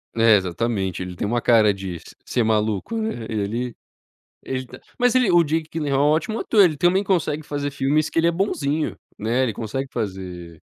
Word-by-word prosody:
É 115 -1 +6
exatamente, 95 0 -2
ele 90 -1 -7
tem 95 - -2
uma 120 +2 0
cara 110 -4 +5
de 95 -3 -6
se - - -15
ser 120 - 0
maluco, 110 - 0
né, 220 - -3
ele 115 +3 -2 0.7
ele 130 0 -3
tá - - -12 0.2
Mas 245 0 +3
ele 250 -7 +4
o 175 -1 +6
Jake 160 +1 -1
Gyllenhall 145 -4 -1
é - - +5
ótimo 215 +8 -2
ator, 210 -3 +4
ele 160 -5 +2
também 180 +5 +3
consegue 170 -6 0
fazer 145 -1 -3
filmes 145 +3 +1
que - - 0
ele 165 - +3
é - - +3
bonzinho, 160 -5 -1 0.2
né, 115 +5 0
ele 125 - 0
consegue 125 +6 -4
fazer 90 -6 -6
130 Hz, 195 wpm, -22 LUFS, 105-160 Hz, 0.7 s, É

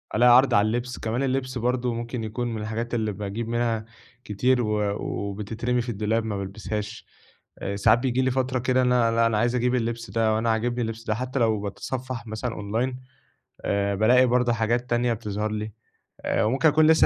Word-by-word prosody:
ألاقي 120 +2 +7
عرض 135 +1 +4
على 100 +1 +5
اللبس، 120 +2 -2
كمان 115 +4 -1
اللبس 130 -1 -1
برضه 125 0 0
ممكن 115 0 -4
يكون 115 +3 -3
من 110 - -4
الحاجات 115 +3 -4
اللي 110 -2 0
باجيب 105 +3 -4
منها 115 -2 0 0.4
كتير، 125 +4 +1
و 105 -2 0
وبتترمي 110 +5 -2
في 120 - -5
الدولاب 110 +1 0
ما 105 -2 -2
بالبسهاش، 105 +2 -5 0.5
آآ، 100 - -3
ساعات 100 +4 +4
بييجي 130 0 0
لي 130 0 +2
فترة 130 0 0
كده 130 +1 +2
أنا 125 -2 +3
لا 115 0 +3
أنا 115 -2 +2
عايز 120 +3 +1
أجيب 125 +1 +1
اللبس 115 -1 -2
ده، 115 -1 +2
أو 110 - +2
أنا 115 0 0
عاجبني 120 +2 0
اللبس 115 0 -4
ده، 110 -1 -1
حتى 130 +2 -3
لو 110 -3 +2
باتصفّح 125 +4 -5
مثلًا 110 +2 -3
أونلاين 115 +5 -2 0.7
آآ، 100 0 +1
بالاقي 125 +5 +5
برضه 125 0 +2
حاجات 120 +2 0
تانية 120 0 +2
بتظهر 105 -1 -3
لي، 105 0 -4 0.5
آآ، 115 - 0
وممكن 135 +8 +3
أكون 155 +1 +4
لسه 160 0 +6
115 Hz, 195 wpm, -25 LUFS, 110-125 Hz, 0.7 s, ألاقي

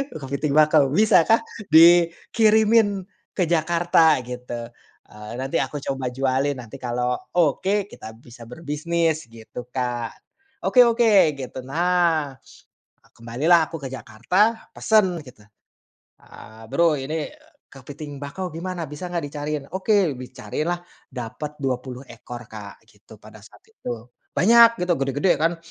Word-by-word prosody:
Kepiting 140 0 -3
bakau, 155 -2 +5
"Bisakah 215 +4 +4 0.2
dikirimin 200 +6 +4 0.3
ke 185 - +1
Jakarta," 165 -1 +3
gitu, 120 -1 -7 0.4
eee, 105 0 -10
"nanti 135 +1 -1
aku 135 +2 -3
coba 135 -2 -3
jualin, 135 +2 0
nanti 115 -3 -10
kalau 125 0 -2 0.2
oke, 190 +5 +1
kita 110 0 -10
bisa 120 +1 -14
berbisnis," 160 +2 -2
gitu 115 +1 -10
Kak. 120 -3 -3 0.5
"Oke 250 - +6
oke," 220 -9 +4
gitu. 130 -1 -7
Nah, 170 -1 +1 0.8
kembalilah 150 +9 +2
aku 165 - -4
ke - - -3
Jakarta, 155 - 0
pesen 190 -6 +2
gitu. 125 -6 -16 0.8
Eee, 110 +1 -14
"Bro 170 -2 +3
ini 150 +3 -3 0.4
kepiting 145 +2 -10
bakau 180 +7 -5
gimana, 170 -1 -5
bisa 150 +5 -7
gak 170 -3 -2
dicariin? 145 0 -4
Oke," 195 -4 +2
dicariinlah. 155 +7 -4 0.3
Dapet 125 +5 -7
20 130 -1 -3
ekor, 120 +1 -10
Kak, 105 -2 -10
gitu, - - -18
pada - - -14
saat - - -18
itu. 120 - -8 0.3
Banyak 230 +8 +6
gitu, 180 0 +1
gede-gede 140 +7 +1
kan. 165 +2 +1
150 Hz, 125 wpm, -23 LUFS, 125-175 Hz, 0.8 s, Oke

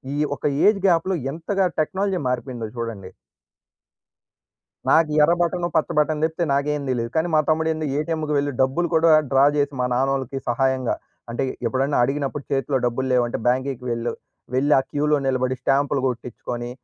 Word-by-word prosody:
ఈ - - -2 0.2
ఒక 130 - -21 0.2
ఏజ్ 210 -1 +4
గ్యాప్‍లో 180 +1 +2 0.2
ఎంతగా 185 +5 0
టెక్నాలజీ 190 +4 0
మారిపోయిందో 125 -2 -3
చూడండి! 115 -5 -5 1.8
నాకు 160 -1 +4
ఎర్ర 170 - +4
బటను, 175 0 0
పచ్చ 160 - +2
బటన్ 150 0 +1
దెప్పితే 160 +2 0
నాకేం 145 +1 0
తెలీదు! 120 -2 -1
కానీ 160 +2 +2
మా - - +5
తమ్ముడు 160 0 +2
ఏంది 155 -1 -3
ఏటీఎంకి 155 0 -2
వెళ్ళి 145 0 0
డబ్బులు 135 +7 +1
కూడా 165 0 +5 0.2
డ్రా 135 +1 +5
జెసి 145 0 0
మా - - +1
నాన్నోళ్ళకి 135 0 -1
సహాయంగా 130 +1 +1 0.3
అంటే 120 +3 -2 0.2
ఎప్పుడైనా 135 +5 0
అడిగినప్పుడు 140 +2 -2
చేతిలో 135 0 +1
డబ్బులు 120 +2 -1
లేవంటే 120 -1 +1
బ్యాంకేకి 130 0 0
వెళ్ళు. 115 0 -2 0.4
వెళ్లి 145 +3 +3
ఆ - - +1
క్యూలో 150 +1 +2
నిలబడి 130 -1 0
స్టాంపులు 140 +1 +1
గొట్టించుకొని 120 0 -5
140 Hz, 155 wpm, -22 LUFS, 125-155 Hz, 1.8 s, మా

